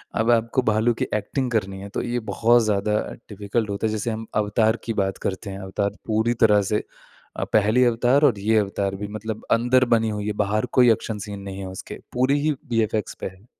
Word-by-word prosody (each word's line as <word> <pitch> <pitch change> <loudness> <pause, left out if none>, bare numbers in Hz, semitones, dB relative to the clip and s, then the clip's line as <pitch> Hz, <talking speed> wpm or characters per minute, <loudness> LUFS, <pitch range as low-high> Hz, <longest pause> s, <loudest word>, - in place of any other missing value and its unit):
अब 110 +2 +1
आपको 115 +2 +2
भालू 110 +1 +2
की - - +3
एक्टिंग 125 +5 -2
करनी 100 -4 -1
है 100 - -8
तो - - -1
ये 120 0 -1
बहुत 120 +1 +4
ज़्यादा 105 0 0 0.4
डिफिकल्ट 105 +1 -2
होता 100 +2 -1
है - - -2
जैसे 110 +2 -2
हम 110 0 -5
अवतार 110 +2 +2
की 115 - -1
बात 95 -2 -1
करते 100 +2 -3
हैं 95 - -7
अवतार 100 +1 -2 0.2
पूरी 110 +2 +1
तरह 105 -1 +5
से 105 - +1 0.5
अ, - - -1
पहली 110 +4 +4
अवतार 120 +4 +3
और 120 -8 +2
ये 110 +3 +2
अवतार 100 -1 -1
भी 105 +1 -5
मतलब 110 0 -6
अंदर 125 +2 +4
बनी 110 -1 +1
हुई 105 -1 -3
है 105 - -1
बाहर 105 +2 0
कोई 125 -2 +7
एक्शन 110 0 -5
सीन 100 -1 -6
नहीं 100 0 -7
है - - -5
उसके, 95 0 -8
पूरी 130 +3 +2
ही 155 +1 +2 0.2
वीएफएक्स 110 -2 0
पे - - -3
है। 95 +2 -13
110 Hz, 215 wpm, -23 LUFS, 100-115 Hz, 0.5 s, कोई